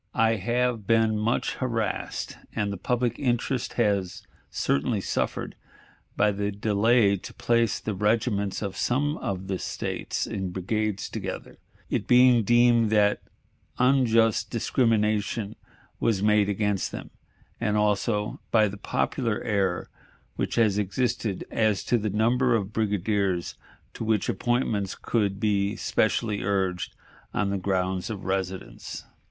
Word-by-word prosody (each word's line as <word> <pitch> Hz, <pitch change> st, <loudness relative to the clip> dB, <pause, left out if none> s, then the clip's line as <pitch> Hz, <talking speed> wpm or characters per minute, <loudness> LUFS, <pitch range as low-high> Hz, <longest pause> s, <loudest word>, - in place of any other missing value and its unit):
I 115 Hz, 0 st, +3 dB
have 120 Hz, +1 st, -1 dB
been 115 Hz, -1 st, +3 dB
much 110 Hz, +3 st, 0 dB
harassed, 115 Hz, -5 st, -2 dB, 0.2 s
and 105 Hz, -2 st, -1 dB
the -, -, -5 dB
public 120 Hz, +4 st, -1 dB
interest 125 Hz, -1 st, -1 dB
has 100 Hz, -6 st, 0 dB, 0.3 s
certainly 100 Hz, -, 0 dB
suffered, -, -, -2 dB, 0.6 s
by 105 Hz, +1 st, +4 dB
the 100 Hz, 0 st, -2 dB
delay 105 Hz, +1 st, +3 dB
to -, -, -10 dB
place 115 Hz, -2 st, +1 dB
the 110 Hz, -, -3 dB
regiments 105 Hz, 0 st, 0 dB
of 100 Hz, -2 st, -4 dB
some 145 Hz, +4 st, 0 dB
of 95 Hz, -1 st, -4 dB
the 95 Hz, -1 st, -3 dB
States -, -, -3 dB
in 95 Hz, -2 st, -3 dB
brigades 105 Hz, +3 st, -2 dB
together, -, -, -6 dB, 0.3 s
it -, -, -2 dB
being 125 Hz, -1 st, +6 dB
deemed 120 Hz, 0 st, +4 dB
that 105 Hz, -1 st, +3 dB, 0.6 s
unjust 120 Hz, -4 st, +3 dB
discrimination 110 Hz, -3 st, 0 dB, 0.4 s
was 105 Hz, -4 st, +1 dB
made 105 Hz, -1 st, +4 dB
against 105 Hz, -1 st, 0 dB
them, -, -, -8 dB, 0.5 s
and 105 Hz, -2 st, 0 dB
also 105 Hz, 0 st, 0 dB
by 110 Hz, -2 st, +4 dB
the 100 Hz, 0 st, -6 dB
popular 105 Hz, -, -1 dB
error 95 Hz, -5 st, 0 dB, 0.5 s
which -, -, -2 dB
has 105 Hz, -4 st, +3 dB
existed 105 Hz, 0 st, -1 dB
as 110 Hz, -3 st, +1 dB
to 120 Hz, -, +1 dB
the 110 Hz, 0 st, -1 dB
number 120 Hz, +4 st, +2 dB
of 100 Hz, -1 st, -2 dB
brigadiers 100 Hz, -4 st, 0 dB, 0.4 s
to -, -, -6 dB
which 110 Hz, -2 st, +1 dB
appointments 115 Hz, -5 st, 0 dB
could 100 Hz, -4 st, -1 dB
be 100 Hz, -1 st, +1 dB
specially 110 Hz, -1 st, 0 dB
urged 95 Hz, -3 st, -1 dB, 0.4 s
on 100 Hz, -1 st, +1 dB
the 100 Hz, -, 0 dB
grounds 95 Hz, +1 st, -1 dB
of 105 Hz, -3 st, -6 dB
residence. 95 Hz, -1 st, -4 dB
105 Hz, 130 wpm, -26 LUFS, 100-115 Hz, 0.6 s, being